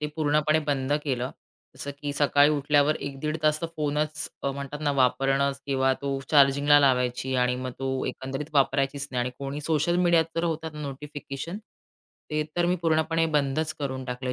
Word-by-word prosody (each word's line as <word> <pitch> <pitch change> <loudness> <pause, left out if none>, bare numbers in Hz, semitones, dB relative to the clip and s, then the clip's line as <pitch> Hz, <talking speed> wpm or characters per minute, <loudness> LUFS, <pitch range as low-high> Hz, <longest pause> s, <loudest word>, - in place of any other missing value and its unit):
ते 150 - -1
पूर्णपणे 155 0 +2
बंद 140 -1 0
केलं. 130 -2 -1 0.5
जसं, 145 - -5
की 145 -1 -2
सकाळी 145 0 +4
उठल्यावर 145 0 +2
1 140 -1 -6
दीड 155 +1 -1
तास 155 +1 +3
तो 165 - -1
फोनच 150 0 -1
अ, 140 - 0
म्हणतात 140 +2 -6
ना 145 -1 +1
वापरणं 135 +1 +2
किंवा 135 -1 +2
तो 140 -1 -1
चार्जिंगला 145 0 +5
लावायची 130 -1 +1
आणि 125 0 0
मग 130 - -3
तो 130 0 -2
एकंदरीत 135 +2 -4
वापरायचीच 140 +1 +1
नाही 125 -1 -1
आणि 125 +1 -1
कोणी 140 +1 -4
सोशल 160 +3 +1
मीडियात 170 -2 +4
तर 165 - +1
होतात 160 -1 -2
नोटिफिकेशन 145 +4 -6 0.7
ते 150 0 0
तर 175 0 +2
मी 180 +1 +2
पूर्णपणे 165 0 +2
बंदच 150 +2 +1
करून 130 -3 -3
टाकलं 125 0 -4
145 Hz, 170 wpm, -26 LUFS, 135-155 Hz, 0.7 s, चार्जिंगला